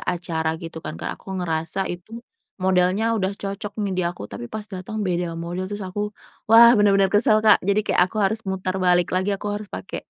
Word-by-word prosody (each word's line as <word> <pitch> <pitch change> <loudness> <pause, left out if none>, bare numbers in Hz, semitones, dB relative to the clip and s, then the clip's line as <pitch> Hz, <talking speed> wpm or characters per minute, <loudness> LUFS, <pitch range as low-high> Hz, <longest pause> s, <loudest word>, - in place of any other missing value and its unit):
acara 165 -2 -2
gitu 165 -1 -8
kan - - -5
Kak, - - -3
aku 190 -1 -6
ngerasa 165 +2 -1
itu 215 +7 -9 0.4
modelnya 190 +4 +2
udah 190 -3 0
cocok 200 +1 -5
nih 195 - -2
di - - +2
aku, 175 - -8
tapi 120 - -7
pas 215 -1 -5
datang 190 +1 -7
beda 175 -2 -2
model, 175 +2 -4
terus 205 -1 -5
aku, 205 +3 -3 0.4
wah 235 +1 +9
bener-bener 195 -2 +4
kesel 215 +1 +4
Kak 215 - +6
jadi 200 +1 +3
kayak - - +2
aku - - -10
harus 220 +3 0
muter 185 -1 -2
balik 180 -1 +3
lagi 185 +2 +1
aku 200 - -8
harus 205 -1 -6
pake - - -6
190 Hz, 200 wpm, -23 LUFS, 175-205 Hz, 0.4 s, wah